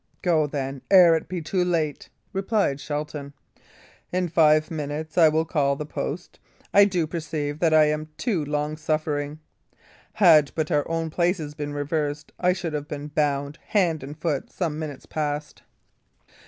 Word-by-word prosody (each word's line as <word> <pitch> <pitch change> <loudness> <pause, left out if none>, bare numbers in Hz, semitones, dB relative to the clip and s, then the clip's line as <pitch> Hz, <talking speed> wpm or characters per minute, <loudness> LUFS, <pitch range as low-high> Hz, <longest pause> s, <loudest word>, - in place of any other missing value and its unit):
"Go, 160 -4 +3
then, 135 -2 -4
ere 180 -4 +8
it 160 - -3
be 175 -3 -4
too 180 +3 0
late," 160 -5 -1 0.2
replied 195 -7 0
Shelton. 145 -1 -5 0.8
"In 180 -1 0
five 155 0 +4
minutes 155 0 -4
I 165 -3 +7
will 160 +1 +1
call 140 -4 +1
the 150 - -5
post. 155 +3 -5 0.3
I 200 0 +8
do 180 -5 0
perceive 155 -2 -4
that 165 -1 +3
I 155 0 +6
am 150 +1 -1
too 200 -11 0
long 150 +1 -2
suffering. 150 -1 -2 0.8
Had 155 -7 +6
but 155 -1 -1
our 145 - +2 0.3
places 170 -3 0
been 145 -1 -5
reversed, 145 0 -2
I 180 0 +3
should 175 -3 -3
have 150 -1 -3
been 150 0 -6
bound 145 0 -1
hand 175 -7 +1
and 145 +3 -8
foot 155 -4 -2
some 160 -4 -2
minutes 150 -4 -6
past." 150 -1 -4
155 Hz, 155 wpm, -25 LUFS, 145-170 Hz, 0.8 s, ere